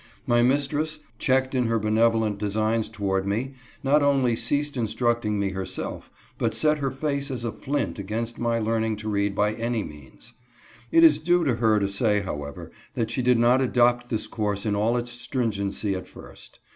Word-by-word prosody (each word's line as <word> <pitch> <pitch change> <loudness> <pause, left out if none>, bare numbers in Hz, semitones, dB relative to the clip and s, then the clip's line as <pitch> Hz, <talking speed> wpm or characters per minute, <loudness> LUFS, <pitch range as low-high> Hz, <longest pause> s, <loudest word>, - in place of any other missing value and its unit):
My 120 0 +3
mistress, 145 +4 +1 0.2
checked 130 0 +1
in 125 -2 +1
her 115 0 +1
benevolent 110 -1 +2
designs 110 +2 0
toward 95 -1 -1
me, 120 +7 -2 0.3
not 145 +2 +4
only 135 -4 +3
ceased 145 +4 0
instructing 115 -2 0
me 100 -1 0
herself, 95 0 -5 0.3
but - - 0
set 150 -1 +2
her 140 -1 0
face 140 +1 -2
as 125 -3 -4
a 115 - -1
flint 140 -3 -3
against 115 +4 -4
my 115 -1 +1
learning 110 0 0
to 110 +1 -7
read 100 -1 0
by 105 +1 +1
any 115 -1 -2
means. 75 - -12 0.6
It 165 - +6
is 155 -2 +7
due 175 +2 +2
to 130 -7 +1
her 110 -2 +3
to 100 - 0
say, 105 +1 +1
however, 75 -6 -6 0.2
that 115 -1 -1
she 130 - -1
did 125 0 +3
not 120 +3 +4
adopt 120 -1 +2
this 110 -2 -1
course 105 -1 -2
in 105 -1 +1
all 110 +4 +1
its 120 0 -3
stringency 110 -5 -2
at 95 -1 -5
first. - - -14
115 Hz, 185 wpm, -25 LUFS, 105-130 Hz, 0.6 s, is